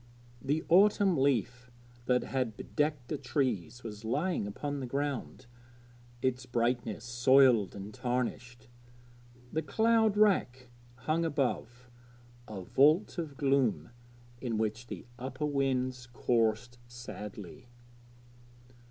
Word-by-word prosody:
The 145 +4 -1
autumn 195 +1 +5
leaf 125 -3 0 0.4
that 125 -1 +3
had 125 -5 -2
bedecked 145 -1 -2
the 150 - -2
trees 125 - -2
was 105 -1 -8
lying 150 - -1
upon 145 +7 -4
the 130 - -4
ground, 140 -1 -3 0.8
its 130 0 -1
brightness 120 -2 -1
soiled 125 -3 +4
and 100 +1 -8
tarnished. 125 0 -3 0.9
The 160 - +1
cloud 220 +6 +2
rack 130 - +2 0.3
hung 155 +7 -1
above, 125 -5 -2 0.6
a 105 -3 -6
vault 155 - +3
of 150 -5 -5
gloom 135 -4 +1 0.5
in 120 -4 -2
which 110 +2 -2
the - - -7
upper 130 +3 -4
winds 130 -3 -1
coursed 120 0 0
sadly. 105 -4 -9
125 Hz, 110 wpm, -31 LUFS, 120-145 Hz, 0.9 s, autumn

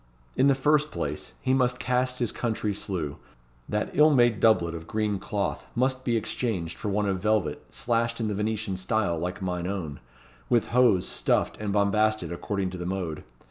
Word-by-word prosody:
In 135 - +4
the 140 - +5
first 150 +2 +2
place, 75 - -4
he 130 - +2
must 125 -1 +2
cast 125 +1 0
his 120 -3 0
country 110 -3 -1
slough. 90 -8 -4 0.5
That 105 0 -1
ill 150 +2 +6
made 120 -7 +4
doublet 90 -7 +4
of 80 -1 -7
green 105 -2 -1
cloth 100 0 -3
must 130 +1 +1
be 120 -3 +1
exchanged 100 -7 -2
for 105 - -4
one 105 +1 +1
of 95 -1 0
velvet 105 -7 0
slashed 115 0 0
in 115 - 0
the 105 - -1
Venetian 105 -1 -2
style 95 -3 0
like 90 +3 -4
mine 90 -1 -2
own, 85 -8 -4 0.5
with 120 -2 +2
hose 120 -7 +4
stuffed - - +1
and 105 -1 -3
bombasted 105 +1 +2
according 95 +1 -2
to 90 - -6
the 90 - -4
mode. 90 -5 -3
105 Hz, 180 wpm, -27 LUFS, 95-120 Hz, 0.5 s, ill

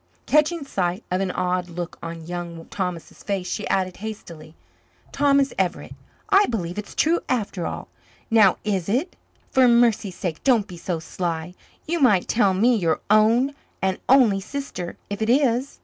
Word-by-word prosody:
Catching 305 +1 +2
sight 185 -4 -2
of 185 +1 +1
an 195 - -1
odd 180 0 -1
look 175 0 -6
on 165 -1 -7
Young 170 -1 -6
Thomas's 180 -4 -5
face, 195 -3 -3
she 210 - -3
added 185 -1 -1
hastily, 170 -7 -9 0.6
"Thomas 280 -1 +2
Everett, 185 -2 -2 0.4
I 400 +1 +5
believe 180 -5 -3
it's 205 - -8
true 335 +2 +3
after 205 -7 -1
all. - - -6 0.4
Now, 215 -5 +5
is 195 -4 -1
it? 270 - -1 0.4
For 260 -1 +5
mercy's 230 -5 +3
sake 175 -5 -4
don't 240 -6 +3
be 180 - -9
so 170 0 -3
sly. 165 +1 -4 0.3
You 340 +2 -1
might 210 - +4
tell 200 -5 +2
me, 235 +6 +4
your 165 -7 +1
own 230 +6 +4 0.3
and 190 -1 -1
only 245 -7 +5
sister, 235 -7 -6
if 205 - -4
it 220 - 0
is." 260 0 +2
200 Hz, 165 wpm, -23 LUFS, 180-245 Hz, 0.6 s, I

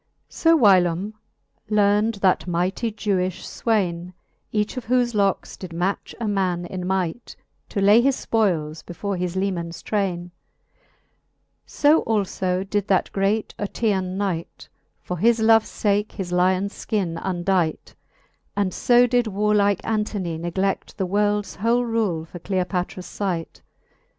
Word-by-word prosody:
II. - - -48
So 330 0 +3
whylome 190 - +3 0.6
learnd 210 0 +2
that 185 -1 +2
mighty 180 +6 -1
Jewifii 190 -4 -3
fwaine, 180 -6 0 0.4
Each 210 +2 -1
of 255 -3 -6
whofe 245 -1 +2
lockes 200 -2 0
did 180 -3 -9
match 180 +4 -2
a 230 - -2
man 185 -4 0
in 180 0 -5
might, 190 +3 -2 0.3
To 205 - -3
lay 205 +4 +6
his 270 +1 0
{poiles 165 -9 0
before 200 +3 -4
his 180 0 -3
lemans 180 -3 -3
traine; 180 -4 -2 1.4
So 300 +2 +3
alfo 190 -3 -1
did 205 0 -1
that 190 - +1
great 200 +2 0
Oetean 195 -3 -1
knight 185 -5 -3 0.4
For 180 -2 -4
his 230 +3 +4
loves 225 0 +4
fake 205 0 +1
his 185 -3 -5
lions 185 +3 +2
Ikin 180 -6 -2
undight: 175 -2 -1 0.6
And 200 -3 0
fo 245 0 +4
did 245 -1 +1
warlike 205 -1 +1
Antony 205 -6 -2
negle^ 190 +3 -2
The 195 - -1
worlds 205 +2 0
whole 235 +4 +2
rule 210 -9 -1
for 175 +2 -10
Cleopatras 180 0 -3
light. 175 -5 -3
195 Hz, 135 wpm, -23 LUFS, 180-215 Hz, 1.4 s, lay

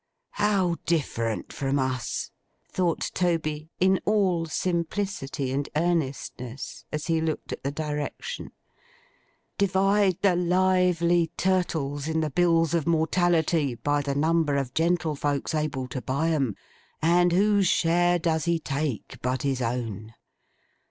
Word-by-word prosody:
'How 195 -5 +1
different 115 -9 -1
from 135 0 -1
us!' 130 -3 -2 0.4
thought 175 -3 -1
Toby, 160 -4 -1
in 190 +1 +4
all 190 -6 +2
simplicity 170 -5 -2
and 140 +1 -2
earnestness, 140 -6 -2
as 150 -1 -3
he 165 -1 +1
looked 160 -1 -3
at - - -6
the 140 - 0
direction. 150 - -4 1.1
'Divide 195 -1 +3
the 190 -3 +4
lively 180 -1 +2
turtles 160 -6 0
in 160 0 0
the 155 -2 -1
bills 165 0 +3
of 165 -2 0
mortality, 165 -4 +2
by 145 +5 0
the 140 -1 -2
number 155 0 +2
of 135 -2 -2
gentlefolks 155 -4 0
able 150 -4 -1
to 130 - -4
buy 140 +7 0
'em; 135 -10 0 0.4
and 175 +2 +3
whose 200 +1 +3
share 175 +1 +3
does 160 -2 0
he 170 -1 +2
take 140 -5 -3
but 130 +1 -1
his 135 -2 0
own! 115 -3 -3
160 Hz, 125 wpm, -26 LUFS, 140-175 Hz, 1.1 s, in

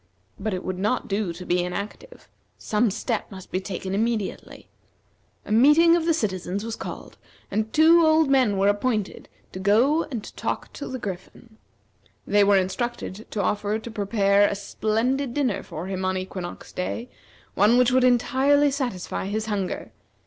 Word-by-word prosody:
But 205 -1 -2
it 180 - -5
would 185 -1 -3
not 210 +6 0
do 200 -2 -1
to 170 +2 -9
be 175 0 +1
inactive. 200 - -7 0.3
Some 215 +2 +1
step 220 +3 -3
must 190 -2 -11
be 185 - 0
taken 190 0 -5
immediately. 220 0 -3 0.8
A - - -7
meeting 300 +9 +6
of 335 -1 0
the 330 - +4
citizens 195 - -2
was 230 -1 -4
called, - - -8 0.3
and 215 +2 -1
two 330 +2 +6
old 315 -1 +4
men 255 -7 +3
were 195 +1 +3
appointed 205 0 -1 0.2
to 185 - -7
go 240 - +3
and 235 -7 -5
talk - - -4
to 285 - -6
the 260 - -4
Griffin. 215 +2 -8 0.7
They 205 0 +4
were 200 0 +5
instructed 195 +2 -3
to 205 - -2
offer 210 +2 0
to 225 +1 -8
prepare 200 -1 +2
a - - -2
splendid 235 +6 -1
dinner 265 -8 0
for 160 +3 -7
him 190 0 -4
on 185 0 0
equinox 185 -1 -7
day, 230 +6 -4 0.5
one 220 +4 +4
which 250 0 +4
would 255 0 +3
entirely 265 +4 +3
satisfy 245 -9 -3
his 215 +2 -2
hunger. 200 - -3
215 Hz, 165 wpm, -24 LUFS, 195-255 Hz, 0.8 s, meeting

